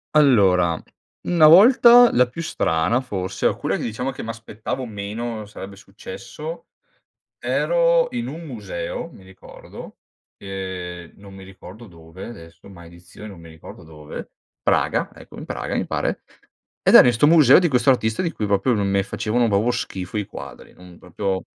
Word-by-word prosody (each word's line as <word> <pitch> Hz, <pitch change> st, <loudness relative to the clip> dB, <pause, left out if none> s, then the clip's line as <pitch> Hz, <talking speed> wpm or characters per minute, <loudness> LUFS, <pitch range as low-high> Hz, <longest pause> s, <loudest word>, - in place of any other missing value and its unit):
Allora, 95 Hz, -, +3 dB, 0.5 s
una 170 Hz, -3 st, +5 dB
volta 240 Hz, +6 st, +7 dB
la 125 Hz, 0 st, +3 dB
più 145 Hz, +7 st, -8 dB
strana 80 Hz, -, 0 dB
forse, 95 Hz, -7 st, -5 dB
alcune -, -, 0 dB
che -, -, -6 dB
diciamo 125 Hz, +4 st, -3 dB
che -, -, -8 dB
m'aspettavo 115 Hz, +2 st, -6 dB
meno 110 Hz, +1 st, -6 dB
sarebbe 100 Hz, -1 st, -10 dB
successo, 485 Hz, -, -10 dB, 0.7 s
ero -, -, +1 dB
in 235 Hz, -, -3 dB
un 165 Hz, +3 st, -8 dB
museo, 100 Hz, -, -6 dB
mi 95 Hz, -, -16 dB
ricordo, 95 Hz, 0 st, -13 dB, 0.4 s
e 95 Hz, -3 st, -7 dB
non 100 Hz, -1 st, -14 dB
mi 95 Hz, -, -12 dB
ricordo 95 Hz, +4 st, -13 dB
dove 85 Hz, +1 st, -12 dB
adesso, 85 Hz, -5 st, -13 dB
maledizione, 85 Hz, +3 st, -13 dB
non 95 Hz, -5 st, -12 dB
mi 85 Hz, -, -13 dB
ricordo 80 Hz, +1 st, -13 dB
dove. 75 Hz, -2 st, -10 dB, 0.3 s
Praga, -, -, 0 dB
ecco, -, -, -15 dB
in -, -, -8 dB
Praga -, -, -5 dB
mi -, -, -1 dB
pare, -, -, -3 dB, 0.6 s
ed -, -, +2 dB
era -, -, +10 dB
in 120 Hz, -, +3 dB
'sto 120 Hz, +6 st, +3 dB
museo 155 Hz, -3 st, +6 dB
di 175 Hz, -, +1 dB
questo 125 Hz, -3 st, +1 dB
artista 110 Hz, -1 st, +1 dB
di 170 Hz, -2 st, -2 dB
cui 105 Hz, -, -4 dB
proprio 100 Hz, +5 st, +1 dB
non 100 Hz, -2 st, -1 dB
me 100 Hz, 0 st, +1 dB
facevano 115 Hz, +4 st, -1 dB
proprio 105 Hz, +5 st, +1 dB
schifo 95 Hz, 0 st, -5 dB
i 105 Hz, -, -2 dB
quadri, -, -, -11 dB
non 90 Hz, -1 st, -16 dB
proprio, 95 Hz, +1 st, -4 dB
105 Hz, 160 wpm, -21 LUFS, 95-130 Hz, 0.7 s, era